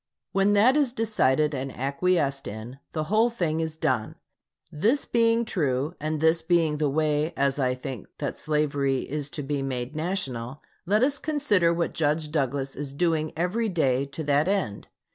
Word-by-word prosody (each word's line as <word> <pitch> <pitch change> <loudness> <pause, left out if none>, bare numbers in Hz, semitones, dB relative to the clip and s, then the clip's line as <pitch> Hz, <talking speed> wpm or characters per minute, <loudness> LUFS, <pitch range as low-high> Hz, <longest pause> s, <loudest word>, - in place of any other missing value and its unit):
When 195 +1 +3
that 225 +6 +5
is 285 -5 +2
decided 155 - +2
and 135 0 -3
acquiesced 140 +1 0
in, 110 +6 -7
the 155 - -2
whole 215 +8 +3
thing 170 -9 -1
is 160 -1 -3
done. 110 -7 -1 0.6
This 225 - +1
being 230 0 +2
true, 145 - -1
and 155 +1 -2
this 160 +2 +3
being 160 -3 +2
the 150 -1 +1
way, 155 +2 0
as 140 +1 +1
I 125 -1 +1
think, 130 -4 -7
that - - -4
slavery 145 -3 0
is 145 -1 -4
to 150 -1 -5
be 140 0 -2
made 130 +1 -3
national, 140 -7 -3 0.3
let 210 +5 +3
us 280 +2 +2
consider 265 - +2
what 170 0 -1
Judge 155 0 0
Douglas 135 -2 -1
is 140 -1 -5
doing 160 0 0
every 205 +7 0
day 140 -6 +1
to 140 +3 -6
that 145 +2 +2
end. 190 - -1
155 Hz, 170 wpm, -26 LUFS, 140-180 Hz, 0.6 s, that